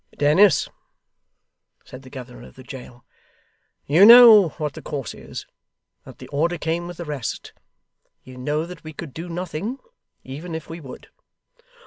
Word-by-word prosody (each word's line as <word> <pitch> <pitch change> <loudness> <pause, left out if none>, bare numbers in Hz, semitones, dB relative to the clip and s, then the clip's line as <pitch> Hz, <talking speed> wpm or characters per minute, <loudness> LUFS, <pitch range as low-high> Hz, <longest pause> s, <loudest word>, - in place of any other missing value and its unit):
'Dennis,' 155 +5 +4 1.2
said 130 - -12
the 130 - -14
governor 125 -2 -10
of - - -19
the 130 - -13
jail, 125 -2 -12 0.8
'you 160 +7 +4
know 225 -4 +9
what 150 -3 -3
the - - -10
course 140 -4 -6
is, - - -9 0.6
and - - -12
that - - -35
the - - -11
order 170 +5 -1
came 165 +2 -3
with 175 -1 -9
the 170 - -7
rest. 145 -5 -6 0.7
You 130 0 -13
know 150 +5 -2
that 180 +1 -11
we 155 0 -9
could 150 -3 -9
do 170 +2 -8
nothing, 180 - -5 0.5
even 155 +6 -8
if 160 - -7
we 165 +1 -9
would. 135 -4 -12
155 Hz, 160 wpm, -22 LUFS, 135-175 Hz, 1.2 s, know